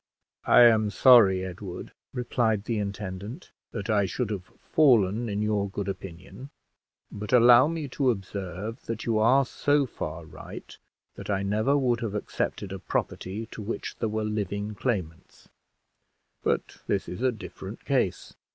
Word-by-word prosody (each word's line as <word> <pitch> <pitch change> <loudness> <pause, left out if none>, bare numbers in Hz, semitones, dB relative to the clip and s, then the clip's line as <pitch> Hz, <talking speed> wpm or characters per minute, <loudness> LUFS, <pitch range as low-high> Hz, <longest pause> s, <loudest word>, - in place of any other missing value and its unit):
"I - - +7
am 110 -3 +6
sorry, 105 -6 +6
Edward," 95 0 -7 0.2
replied 120 -4 0
the 110 0 -2
intendant, 100 - -6 0.2
"that 100 - -5
I 105 -3 +2
should 115 +3 -2
have 95 -4 -4
fallen 115 -6 +3
in 105 +1 -1
your 105 -2 0
good 100 0 -4
opinion; 95 +7 -8 0.6
but 105 +1 -6
allow 125 +2 +7
me 160 -2 -3
to 130 0 +1
observe 100 +1 -4
that 115 -1 -4
you 115 -2 +1
are 130 +5 +4
so 145 +3 +1
far 80 -8 -6
right 80 - -10 0.4
that - - -9
I 100 -1 0
never 110 +8 +2
would 125 -4 +1
have 110 -4 -3
accepted 100 -1 -3
a 95 - -5
property 95 +3 -3
to - - -7
which 105 +3 -5
there 110 - -1
were 110 0 -2
living 105 0 -3
claimants; 95 -8 -4 0.9
but - - -1
this - - 0
is 90 - -6
a 130 0 +3
different 100 -1 -9
case. 130 -10 0
105 Hz, 150 wpm, -27 LUFS, 100-120 Hz, 0.9 s, I